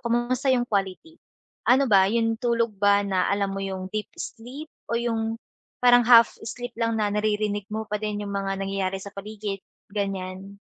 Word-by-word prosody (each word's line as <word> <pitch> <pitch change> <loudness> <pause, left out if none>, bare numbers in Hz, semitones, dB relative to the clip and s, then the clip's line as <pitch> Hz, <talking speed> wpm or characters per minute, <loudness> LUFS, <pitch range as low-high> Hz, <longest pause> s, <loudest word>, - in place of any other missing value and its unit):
kumusta 240 +3 0
yung 245 -1 +2
quality? 205 - -3 0.5
Ano 265 +2 +5
ba 190 -2 +6
yung 225 0 +1
tulog 235 -2 +1
ba 205 0 +4
na 190 -2 +1
alam 200 0 0
mo 195 - -4
yung 190 -1 -4
deep 215 0 -3
sleep 260 +7 -8 0.2
o 235 - +1
yung 225 -1 -1 0.5
parang 245 -1 +6
half 235 -1 +8
sleep 245 +1 -6
lang 230 -1 +1
na 210 -1 +1
naririnig 210 -1 0
mo 220 0 -3
pa 210 - 0
din 210 -1 -3
yung 200 - -5
mga 195 -1 -2
nangyayari 195 -1 -1
sa 200 0 -9
paligid, 205 0 -5 0.3
ganyan? 195 -1 -4
210 Hz, 175 wpm, -25 LUFS, 195-235 Hz, 0.5 s, half